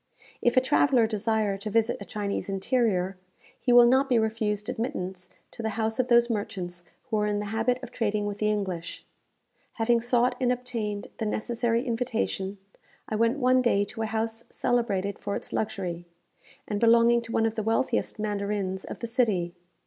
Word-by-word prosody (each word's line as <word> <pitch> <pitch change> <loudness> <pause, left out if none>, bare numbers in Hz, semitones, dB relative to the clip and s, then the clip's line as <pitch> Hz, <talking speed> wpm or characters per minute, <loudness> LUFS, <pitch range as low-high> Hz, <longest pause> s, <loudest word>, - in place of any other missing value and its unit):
If 240 +2 +2
a - - +8
traveller 260 -2 +3
desire 215 -2 0
to 215 - -4
visit 225 +2 +1
a - - -6
Chinese 200 -1 -3
interior, 195 -2 0 0.4
he 245 - +1
will 240 0 +9
not 265 +3 +4
be 245 - +4
refused 215 -2 0
admittance 190 -7 -4 0.2
to - - -8
the 220 - -1
houses 220 +1 -1
of 255 - +2
those 235 -1 +5
merchants 195 -6 -4 0.2
who 220 - -2
are 210 0 +1
in 205 0 0
the 210 - -2
habit 235 +3 +1
of - - -7
trading 210 -2 -1
with 205 0 -4
the 215 - +1
English. 190 -5 -3 0.7
Having 230 +1 +2
sought 245 +1 +2
and 250 -1 +3
obtained 230 -5 -3
the 220 - -1
necessary 235 +2 0
invitation, 225 -5 -2 0.5
I 220 - -1
went 230 +4 +2
one 255 -1 +4
day 205 -5 +2
to 225 +3 -7
a 220 - 0
house 225 +1 -2
celebrated 205 -5 0
for 200 - -3
its - - -6
luxury, 180 -5 -3 0.6
and 205 - -2
belonging 235 +1 +5
to 230 0 -9
one 225 - +2
of 225 - 0
the 220 - -2
wealthiest 225 +3 0
mandarins 200 -2 -2
of - - -7
the - - -2
city. 205 -8 +1
220 Hz, 180 wpm, -27 LUFS, 205-235 Hz, 0.7 s, will